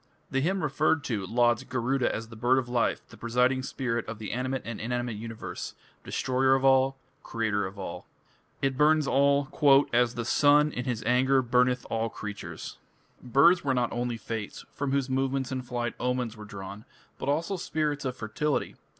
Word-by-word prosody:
The 135 Hz, -1 st, +1 dB
hymn 185 Hz, +5 st, 0 dB
referred 150 Hz, +1 st, +1 dB
to 105 Hz, -8 st, -2 dB
lauds 120 Hz, 0 st, +2 dB
Garuda 130 Hz, +1 st, 0 dB
as 115 Hz, +1 st, -5 dB
"the 115 Hz, -, -10 dB
bird 120 Hz, +4 st, +2 dB
of 130 Hz, -2 st, 0 dB
life, 120 Hz, -1 st, 0 dB
the -, -, -14 dB
presiding 125 Hz, +3 st, +1 dB
spirit 125 Hz, -3 st, -2 dB
of 110 Hz, 0 st, -5 dB
the 105 Hz, -2 st, -6 dB
animate 130 Hz, +2 st, -2 dB
and 115 Hz, -1 st, -5 dB
inanimate 120 Hz, 0 st, -2 dB
universe... 115 Hz, +1 st, -6 dB, 0.3 s
destroyer 130 Hz, +1 st, +2 dB
of 135 Hz, 0 st, 0 dB
all, 135 Hz, 0 st, +4 dB, 0.2 s
creator 105 Hz, -4 st, -1 dB
of 95 Hz, +2 st, -11 dB
all". 95 Hz, -3 st, -7 dB, 0.6 s
It 135 Hz, -1 st, 0 dB
burns 155 Hz, 0 st, +4 dB
all 140 Hz, +1 st, +3 dB, 0.5 s
"as 120 Hz, 0 st, +3 dB
the 120 Hz, -1 st, -3 dB
sun 150 Hz, +4 st, +4 dB
in 125 Hz, -2 st, -4 dB
his 120 Hz, -4 st, -2 dB
anger 130 Hz, +3 st, +3 dB
burneth 125 Hz, +1 st, +2 dB
all 115 Hz, 0 st, 0 dB
creatures". 105 Hz, -1 st, -7 dB, 0.4 s
Birds 140 Hz, +9 st, +4 dB
were 135 Hz, -2 st, +1 dB
not 125 Hz, -1 st, 0 dB
only 120 Hz, 0 st, -2 dB
fates, 110 Hz, -1 st, -6 dB
from 140 Hz, -1 st, -3 dB
whose 140 Hz, -1 st, +1 dB
movements 135 Hz, 0 st, -1 dB
in 130 Hz, -1 st, -2 dB
flight 120 Hz, -1 st, -3 dB
omens 125 Hz, -2 st, -1 dB
were 105 Hz, -1 st, -10 dB
drawn, 100 Hz, 0 st, -8 dB, 0.4 s
but 135 Hz, -, -3 dB
also 165 Hz, +7 st, 0 dB
spirits 155 Hz, -4 st, -2 dB
of 130 Hz, -2 st, -3 dB
fertility. 125 Hz, +7 st, -2 dB
125 Hz, 175 wpm, -28 LUFS, 115-135 Hz, 0.6 s, all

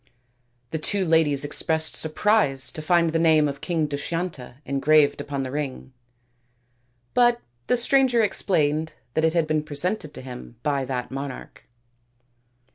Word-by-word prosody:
The 160 Hz, -, -2 dB
two 195 Hz, +4 st, 0 dB
ladies 155 Hz, -4 st, +2 dB
expressed 160 Hz, +2 st, 0 dB
surprise 160 Hz, -5 st, +2 dB
to 155 Hz, -, -6 dB
find 170 Hz, +1 st, +2 dB
the 165 Hz, -, 0 dB
name 160 Hz, -2 st, +4 dB
of 140 Hz, -1 st, -6 dB
King 165 Hz, -3 st, 0 dB
Dushyanta 145 Hz, -2 st, -4 dB
en 140 Hz, 0 st, -2 dB
graved 150 Hz, +1 st, +4 dB
upon 140 Hz, -1 st, -4 dB
the 130 Hz, -, -5 dB
ring, 135 Hz, -2 st, -5 dB, 1.2 s
but 240 Hz, -1 st, +4 dB, 0.3 s
the 250 Hz, -, +2 dB
stranger 250 Hz, -2 st, +3 dB
explained 160 Hz, -6 st, 0 dB, 0.2 s
that 160 Hz, -, 0 dB
it 160 Hz, +1 st, +1 dB
had 165 Hz, -2 st, +3 dB
been 155 Hz, 0 st, 0 dB
presented 155 Hz, +3 st, -3 dB
to -, -, -6 dB
him 125 Hz, -2 st, -9 dB
by 140 Hz, -3 st, 0 dB
that 125 Hz, -1 st, -4 dB
monarch. 135 Hz, -1 st, -7 dB
155 Hz, 145 wpm, -24 LUFS, 140-170 Hz, 1.2 s, name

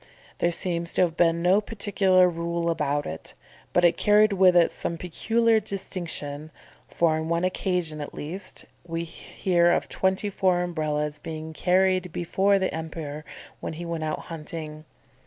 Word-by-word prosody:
There 170 Hz, -, +3 dB
seems 170 Hz, -1 st, -2 dB
to -, -, +2 dB
have 170 Hz, -3 st, +2 dB
been 170 Hz, 0 st, +2 dB
no 190 Hz, +4 st, +4 dB
particular 195 Hz, -4 st, +3 dB
rule 170 Hz, 0 st, -1 dB
about 145 Hz, -2 st, -1 dB
it, 80 Hz, +1 st, -7 dB, 0.4 s
but 175 Hz, -, +3 dB
it 170 Hz, -, +4 dB
carried 210 Hz, 0 st, +4 dB
with 185 Hz, -2 st, +5 dB
it 170 Hz, -1 st, +5 dB
some 170 Hz, -, -4 dB
peculiar 225 Hz, +7 st, +2 dB
distinction; 165 Hz, -7 st, -5 dB, 0.4 s
for, 170 Hz, -2 st, +2 dB
on 160 Hz, +1 st, -3 dB
one 170 Hz, +1 st, +1 dB
occasion 180 Hz, -4 st, -1 dB
at 145 Hz, -, -6 dB
least, 185 Hz, +6 st, -6 dB, 0.2 s
we 165 Hz, -1 st, -3 dB
hear 175 Hz, +1 st, 0 dB
of -, -, 0 dB
twenty 190 Hz, +2 st, 0 dB
four 185 Hz, -2 st, +2 dB
Umbrellas 150 Hz, -3 st, -2 dB
being 160 Hz, 0 st, -6 dB
carried 185 Hz, +1 st, +2 dB
before 195 Hz, +4 st, +2 dB
the 190 Hz, -1 st, -1 dB
Emperor 160 Hz, -2 st, -5 dB, 0.4 s
when -, -, -5 dB
he 170 Hz, +2 st, -6 dB
went 165 Hz, -1 st, -3 dB
out 155 Hz, -, -2 dB
hunting. 155 Hz, -1 st, -7 dB
170 Hz, 155 wpm, -26 LUFS, 160-185 Hz, 0.4 s, with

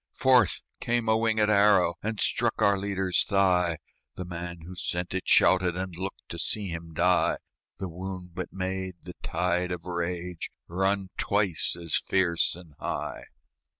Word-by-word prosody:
Forth 125 Hz, -7 st, +4 dB, 0.2 s
came 120 Hz, -1 st, 0 dB
a -, -, +4 dB
wingèd 110 Hz, -1 st, +2 dB
arrow, 100 Hz, -4 st, +5 dB
And 110 Hz, 0 st, -3 dB
struck -, -, 0 dB
our 100 Hz, 0 st, +4 dB
leader's 95 Hz, -2 st, +1 dB
thigh; 90 Hz, -4 st, +2 dB, 0.4 s
The 90 Hz, -, -5 dB
man 85 Hz, -1 st, -6 dB
who 85 Hz, +3 st, -9 dB
sent 90 Hz, +1 st, -3 dB
it 95 Hz, -, -3 dB
shouted, 90 Hz, -1 st, +5 dB
And 95 Hz, -1 st, -4 dB
looked 95 Hz, +3 st, -6 dB
to 85 Hz, -, -6 dB
see 100 Hz, +2 st, 0 dB
him 85 Hz, -1 st, -7 dB
die; -, -, +3 dB, 0.4 s
The 95 Hz, -, -4 dB
wound 90 Hz, 0 st, -7 dB
but 90 Hz, 0 st, -5 dB
made 95 Hz, -1 st, -3 dB
the 90 Hz, -, -8 dB
tide 90 Hz, +1 st, 0 dB
of 90 Hz, -1 st, -5 dB
rage 90 Hz, 0 st, -3 dB, 0.2 s
Run 95 Hz, +2 st, 0 dB
twice 100 Hz, -5 st, 0 dB
as 85 Hz, -2 st, -2 dB
fierce 85 Hz, -4 st, +1 dB
and 85 Hz, -3 st, -13 dB
high. -, -, -4 dB
90 Hz, 155 wpm, -28 LUFS, 85-100 Hz, 0.4 s, arrow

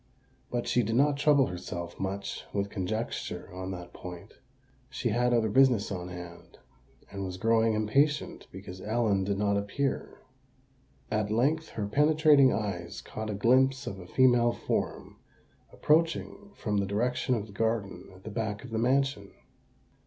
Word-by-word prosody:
But 120 Hz, -1 st, -2 dB
she 120 Hz, +1 st, +3 dB
did 115 Hz, 0 st, -1 dB
not 140 Hz, +2 st, +3 dB
trouble 140 Hz, -1 st, +4 dB
herself 90 Hz, -2 st, -6 dB
much 100 Hz, +1 st, -4 dB
with 100 Hz, 0 st, -1 dB
conjecture 105 Hz, -1 st, -4 dB
on 95 Hz, 0 st, -5 dB
that 90 Hz, -2 st, -7 dB
point: 90 Hz, +3 st, -9 dB, 0.6 s
she 125 Hz, -, -2 dB
had 120 Hz, +3 st, +2 dB
other 115 Hz, -2 st, +3 dB
business 115 Hz, -2 st, +3 dB
on 90 Hz, -2 st, -4 dB
hand, 90 Hz, -1 st, -10 dB, 0.5 s
and 100 Hz, 0 st, -5 dB
was 90 Hz, -1 st, -5 dB
growing 115 Hz, +2 st, +3 dB
impatient 140 Hz, +8 st, +1 dB
because 95 Hz, -1 st, -9 dB
Ellen 105 Hz, -2 st, +1 dB
did 100 Hz, +1 st, -1 dB
not 100 Hz, 0 st, +1 dB
appear. 125 Hz, +7 st, -2 dB, 0.9 s
At 105 Hz, -1 st, 0 dB
length 145 Hz, +9 st, +1 dB
her 105 Hz, -, -3 dB
penetrating 150 Hz, +2 st, +5 dB
eyes 85 Hz, -5 st, -3 dB
caught 110 Hz, 0 st, -6 dB
a 105 Hz, -, -2 dB
glimpse 130 Hz, +5 st, +3 dB
of 95 Hz, -, -5 dB
a 90 Hz, -, -10 dB
female 120 Hz, 0 st, +4 dB
form -, -, -3 dB, 0.5 s
approaching 165 Hz, +6 st, 0 dB
from 105 Hz, -2 st, -2 dB
the 100 Hz, -1 st, 0 dB
direction 125 Hz, +5 st, 0 dB
of 105 Hz, -3 st, -3 dB
the 100 Hz, -, -14 dB
garden 100 Hz, -4 st, -2 dB
at 95 Hz, -, -17 dB
the 110 Hz, -, -7 dB
back 105 Hz, -1 st, -3 dB
of 125 Hz, -, -10 dB
the 110 Hz, -, -1 dB
mansion. 130 Hz, -4 st, +1 dB
110 Hz, 155 wpm, -29 LUFS, 100-130 Hz, 0.9 s, penetrating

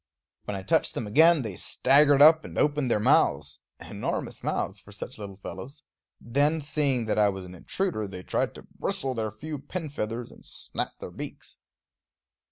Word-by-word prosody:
When 105 Hz, -, -3 dB
I 95 Hz, -, -5 dB
touched -, -, +1 dB
them 115 Hz, -, -3 dB
again 155 Hz, +7 st, +5 dB
they 105 Hz, -5 st, -5 dB
staggered 140 Hz, -, +5 dB
up 160 Hz, +1 st, +7 dB
and -, -, -9 dB
opened 150 Hz, -3 st, +2 dB
their 105 Hz, -, +2 dB
mouths, 75 Hz, -7 st, +2 dB, 0.2 s
enormous -, -, -4 dB
mouths 100 Hz, -, -2 dB
for 100 Hz, -, -16 dB
such 110 Hz, +4 st, -7 dB
little 100 Hz, -2 st, -7 dB
fellows; 120 Hz, -, -8 dB, 0.4 s
then, 145 Hz, +7 st, +1 dB
seeing 145 Hz, -5 st, 0 dB
that 110 Hz, 0 st, 0 dB
I 105 Hz, -1 st, +5 dB
was 95 Hz, -1 st, -5 dB
an 90 Hz, -, -10 dB
intruder, 110 Hz, -, -2 dB
they 95 Hz, -1 st, -8 dB
tried -, -, -1 dB
to -, -, -11 dB, 0.2 s
bristle 135 Hz, -1 st, 0 dB
their 110 Hz, -2 st, -2 dB
few 145 Hz, +8 st, -7 dB
pin 160 Hz, +1 st, -6 dB
feathers 115 Hz, -2 st, -4 dB
and -, -, -16 dB
snap -, -, -4 dB
their -, -, -7 dB
beaks. -, -, -8 dB
120 Hz, 175 wpm, -27 LUFS, 100-150 Hz, 0.4 s, up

